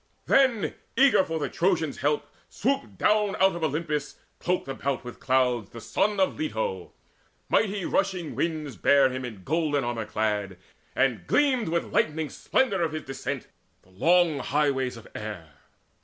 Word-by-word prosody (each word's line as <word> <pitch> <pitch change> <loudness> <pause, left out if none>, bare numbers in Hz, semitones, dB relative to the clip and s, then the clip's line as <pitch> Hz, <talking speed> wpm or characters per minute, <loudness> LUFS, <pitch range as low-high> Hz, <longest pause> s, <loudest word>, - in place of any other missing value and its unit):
Then, 260 -6 +3 0.2
eager 265 -6 +6
for 165 -2 -3
the 150 - -1
Trojans' 165 -5 0
help, 145 +1 0 0.2
swooped 275 +4 -2
down 210 -2 +2
Out 190 -1 +3
of 170 - -5
Olympus, 150 -1 -2 0.2
cloaked 180 -3 -1
about 135 -1 -2
with 125 -1 -9
clouds, 125 -5 +1
The 115 - -10
son 200 - 0
of 190 - +1
Leto. 465 +11 -3 0.6
Mighty 200 -4 +1
rushing 190 -5 -1
winds 155 -6 -2
Bare 135 +5 +4
him 130 0 -4
in 110 -7 -7
golden 150 - 0
armour 120 -2 -2
clad; 105 -3 -1 0.4
and 130 -3 +1
gleamed 260 - +2
With 170 +1 -2
lightning 155 -1 +1
splendour 215 -9 +1
of 160 -2 0
his 155 - -4
descent 135 0 -5 0.4
the 95 - -24
long 165 - +3
Highways 135 -3 0
of 115 - -12
air. 105 -7 -7
155 Hz, 155 wpm, -26 LUFS, 130-190 Hz, 0.6 s, eager